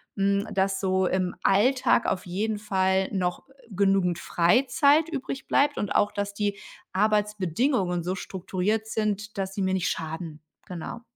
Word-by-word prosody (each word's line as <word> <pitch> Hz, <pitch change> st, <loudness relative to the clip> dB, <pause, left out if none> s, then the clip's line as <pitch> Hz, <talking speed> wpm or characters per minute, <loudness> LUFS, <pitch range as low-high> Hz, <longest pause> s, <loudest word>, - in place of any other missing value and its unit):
hm, 200 Hz, 0 st, +1 dB
dass 195 Hz, -1 st, 0 dB
so 190 Hz, -1 st, +1 dB
im 185 Hz, -1 st, -1 dB
Alltag 245 Hz, +5 st, +3 dB
auf 180 Hz, -, -1 dB
jeden 210 Hz, +4 st, -2 dB
Fall 190 Hz, -2 st, +1 dB
noch, 180 Hz, -3 st, -2 dB
äh, -, -, -21 dB, 0.2 s
genügend 195 Hz, -3 st, +2 dB
Freizeit 265 Hz, -, +3 dB
übrigbleibt 280 Hz, 0 st, 0 dB
und 205 Hz, -, -2 dB
auch, 205 Hz, -, +3 dB
dass 205 Hz, 0 st, -3 dB
die 205 Hz, -1 st, -1 dB, 0.4 s
Arbeitsbedingungen 205 Hz, -, +1 dB
so 185 Hz, +2 st, -2 dB
strukturiert 190 Hz, +4 st, -2 dB
sind, 215 Hz, -1 st, -2 dB
dass 195 Hz, 0 st, -3 dB
sie 200 Hz, -, -2 dB
mir 190 Hz, 0 st, +1 dB
nicht 185 Hz, -2 st, 0 dB
schaden. 160 Hz, -1 st, -5 dB, 0.3 s
Genau. 180 Hz, +5 st, -6 dB
195 Hz, 145 wpm, -26 LUFS, 185-215 Hz, 0.4 s, Alltag